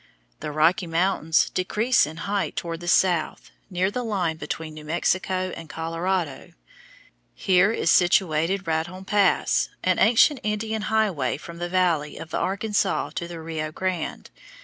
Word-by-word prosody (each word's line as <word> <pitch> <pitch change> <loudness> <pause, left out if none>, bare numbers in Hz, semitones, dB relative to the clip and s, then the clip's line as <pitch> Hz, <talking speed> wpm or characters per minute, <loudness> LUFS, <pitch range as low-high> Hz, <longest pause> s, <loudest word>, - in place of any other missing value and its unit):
The 150 - -5
Rocky 170 +5 +2
Mountains 165 -1 +1
decrease 215 +4 +2
in 160 +1 -9
height 200 0 -1
toward 165 -2 -4
the 175 - -9
south, 175 -2 +1 0.2
near 185 +1 0
the 250 +3 -3
line 185 -8 -1
between 155 +1 -5
New 155 0 -10
Mexico 185 +3 -1
and 165 -2 -10
Colorado. 165 -1 -3 0.8
Here 190 +2 +3
is 170 -6 +1
situated 175 0 +2
Raton 165 +4 -3
Pass, 200 -2 +2
an 185 -1 +2
ancient 245 +6 +5
Indian 215 +1 -2
highway 195 - +1
from 170 +2 -10
the 175 0 -3
valley 170 -5 +1
of 165 -1 -9
the - - -1
Arkansas 200 +1 0
to 170 - -4
the 170 -1 -8
Rio 160 -1 -4
Grande. 185 -1 -4
180 Hz, 150 wpm, -24 LUFS, 160-195 Hz, 0.8 s, ancient